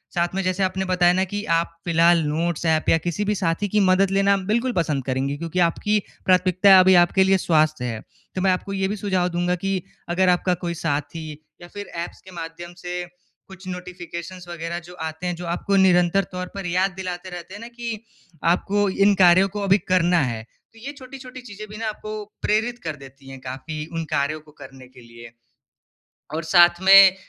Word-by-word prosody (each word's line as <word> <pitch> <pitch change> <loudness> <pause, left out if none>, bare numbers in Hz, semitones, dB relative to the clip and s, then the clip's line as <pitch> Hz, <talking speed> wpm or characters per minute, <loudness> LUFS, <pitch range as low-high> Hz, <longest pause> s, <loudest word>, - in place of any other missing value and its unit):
साथ 175 +1 0
में 195 - 0
जैसे 185 +1 0
आपने, 190 0 -1
बताया 180 -1 +3
ना 190 +1 +1
कि 205 +2 -4
आप 170 0 -1
फिलहाल 170 0 +4
नोट्स 165 +2 -2
ऐप 160 -1 +2
या 165 - +5
किसी 175 +5 -3
भी 210 0 0
साथी 180 +2 -1
की 210 - +2
मदद 190 0 +3
लेना 195 0 +3 0.2
बिल्कुल 235 +3 +1
पसंद 150 -6 -1
करेंगी 135 +2 -1
क्योंकि 170 +3 -3
आपकी 210 +5 0 0.3
प्राथमिकता 185 +1 +5
अभी 185 0 +6
आपके 190 +2 +3
लिए 190 0 +4
स्वास्थ्य 155 -6 +1
है। 115 -2 -3 0.4
तो 185 - -2
मैं 190 0 +3
आपको 190 +2 -3
ये 190 0 0
भी 205 - -3
सुझाव 190 -3 0
दूँगा 175 +1 0
कि, 190 0 -2 0.3
अगर 185 +1 +2
आपका 180 +1 +2
कोई 170 -1 -2
साथी 150 +1 -3 0.3
या 175 - -10
फ़िर 205 +2 -8 0.2
ऐप्स - - -10
के 190 - -14
माध्यम 170 +1 -8
से 180 0 -5 0.4
कुछ 190 -1 -13
नोटिफ़िकेशन्स 180 0 -8
वग़ैरह 170 0 -5
जो 180 - -11 0.2
आते 160 +3 -6
हैं 175 - -2
जो 175 - -8
आपको 200 +2 -1
निरंतर 180 +2 +3
तौर 180 0 -5
पर 195 -1 -5
याद 185 +3 +1
दिलाते 185 -1 -5
रहते 175 +1 -9
हैं 205 - -9
ना 230 - -8
कि, 235 -2 -6 0.4
आपको 200 +4 +1
इन 200 +2 +3
कार्यों 180 +2 +6
को 205 - -2
अभी 195 0 +4
करना 175 -1 +3
है। 110 -1 -6
तो 225 - -24
ये 270 +5 -6
छोटी-छोटी 255 -1 -10
चीज़ें 215 -3 -10
भी 210 - -9
ना 225 0 -3
आपको 215 0 -6 0.2
प्रेरित 230 +3 0
कर 155 -2 -4
देती 135 0 -15
है 135 - -9
काफ़ी 150 +4 -6
उन 165 0 -2
कार्यों 140 +3 0
को 150 0 -19
करने 130 -1 -13
के 125 0 -17
लिए। 115 0 -13 1.0
और 160 +1 -2
साथ 175 +1 +5
में 195 0 +8
180 Hz, 200 wpm, -22 LUFS, 165-195 Hz, 1.0 s, में